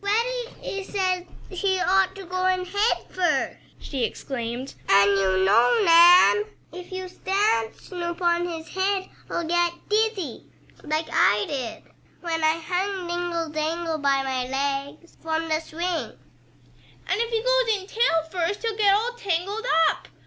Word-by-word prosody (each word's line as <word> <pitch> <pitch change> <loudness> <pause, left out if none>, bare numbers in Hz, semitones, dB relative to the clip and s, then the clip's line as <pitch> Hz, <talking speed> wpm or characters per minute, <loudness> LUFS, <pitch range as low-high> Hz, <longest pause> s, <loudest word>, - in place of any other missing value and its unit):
"Freddie 465 -1 -2
says 370 -2 -1 0.3
he 380 0 0
ought 380 +1 +2
to 390 -1 -9
go 370 +1 -1
in 370 0 +1
head 405 +5 +1
first," 365 -2 0 0.2
she 265 -4 -4
exclaimed, 245 +1 -4 0.2
"and 200 +1 +6
you 190 -1 +2
know, 235 - +4
Nan, 350 +5 +7 0.3
if 360 +1 -9
you 370 0 -5
stand 365 - 0
Snoop 345 -2 -6
on 345 0 +1
his 325 -2 -7
head 380 0 -1 0.2
he'll 345 - -2
get 345 +1 +1 0.2
dizzy, 420 - -1 0.3
like 310 +1 -2
I 205 0 +3
did 260 -6 -5 0.4
when 325 -2 -2
I 315 +1 +3
hung 370 +2 -2
dingle 345 -1 -2
dangle 315 +1 -2
by 275 -1 +2
my 260 -2 -2
legs 275 +4 -3
from 325 0 -2
the 315 -1 +1
swing." 335 +2 -4 0.9
"And 405 - 0
if 465 - -1
he 455 -1 -1
goes - - +2
in - - -11
tail 370 -8 +2
first 365 +3 -2
he'll 450 -2 -1
get 405 -2 +4
all 455 +4 0
tangled 405 0 -3 0.2
up!" - - -2
350 Hz, 150 wpm, -24 LUFS, 310-390 Hz, 0.9 s, Nan